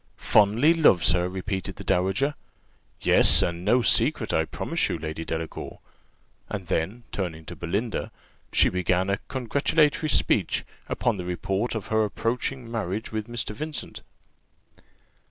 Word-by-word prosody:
"Fondly 110 Hz, +10 st, +4 dB
loves 100 Hz, -, +5 dB
her!" 90 Hz, 0 st, +1 dB
repeated 95 Hz, 0 st, -4 dB
the -, -, -9 dB
dowager: 95 Hz, +11 st, +1 dB, 0.7 s
"yes; -, -, +6 dB
and 85 Hz, 0 st, -2 dB
no 125 Hz, +5 st, +3 dB
secret, -, -, +2 dB
I 80 Hz, -, +2 dB
promise 75 Hz, -, -2 dB
you, -, -, -2 dB
Lady 80 Hz, +1 st, -5 dB
Delacour:" 80 Hz, 0 st, -5 dB, 0.7 s
and 100 Hz, -3 st, -4 dB
then, 95 Hz, +7 st, -2 dB
turning 80 Hz, -5 st, -4 dB
to -, -, -8 dB
Belinda, 100 Hz, +7 st, -3 dB, 0.4 s
she -, -, +4 dB
began 90 Hz, +1 st, 0 dB
a 100 Hz, -, 0 dB
congratulatory 145 Hz, +4 st, +1 dB
speech, -, -, +1 dB, 0.2 s
upon 120 Hz, -4 st, 0 dB
the 90 Hz, -, -5 dB
report 95 Hz, +6 st, -2 dB
of 110 Hz, -, -4 dB
her 110 Hz, 0 st, +2 dB
approaching 120 Hz, +3 st, -3 dB
marriage 110 Hz, -1 st, -3 dB
with 110 Hz, -1 st, -3 dB
Mr. 120 Hz, -2 st, -3 dB
Vincent. 155 Hz, +5 st, -5 dB
100 Hz, 135 wpm, -25 LUFS, 90-120 Hz, 0.7 s, yes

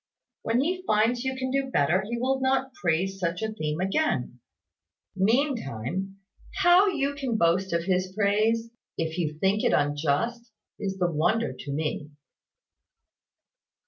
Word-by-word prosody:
When 230 Hz, +3 st, +1 dB
he 365 Hz, +6 st, -1 dB
finds 230 Hz, +3 st, +2 dB
you 265 Hz, 0 st, -2 dB
can 260 Hz, 0 st, -3 dB
do 270 Hz, 0 st, 0 dB
better, 170 Hz, -, +2 dB
he 225 Hz, +5 st, -4 dB
will 265 Hz, +2 st, 0 dB
not 265 Hz, 0 st, 0 dB
praise 190 Hz, -, -1 dB
such 180 Hz, +2 st, -2 dB
a 220 Hz, 0 st, -2 dB
theme 155 Hz, -6 st, -3 dB
again. 195 Hz, -, 0 dB, 0.8 s
Meantime, 195 Hz, -, -1 dB, 0.4 s
how 355 Hz, +3 st, +5 dB
you 285 Hz, -7 st, 0 dB
can 265 Hz, -5 st, -2 dB
boast 185 Hz, +2 st, +2 dB
of 170 Hz, 0 st, 0 dB
his 185 Hz, 0 st, 0 dB
praise, 215 Hz, +3 st, +1 dB, 0.3 s
if 165 Hz, +1 st, -2 dB
you 155 Hz, -3 st, -2 dB
think 195 Hz, +5 st, +1 dB
it -, -, +3 dB
unjust, 150 Hz, -, 0 dB, 0.3 s
is 195 Hz, -1 st, -3 dB
the 175 Hz, -2 st, +1 dB
wonder 215 Hz, +9 st, +1 dB
to 140 Hz, -, -8 dB
me." 150 Hz, 0 st, -3 dB
205 Hz, 145 wpm, -26 LUFS, 170-260 Hz, 0.8 s, how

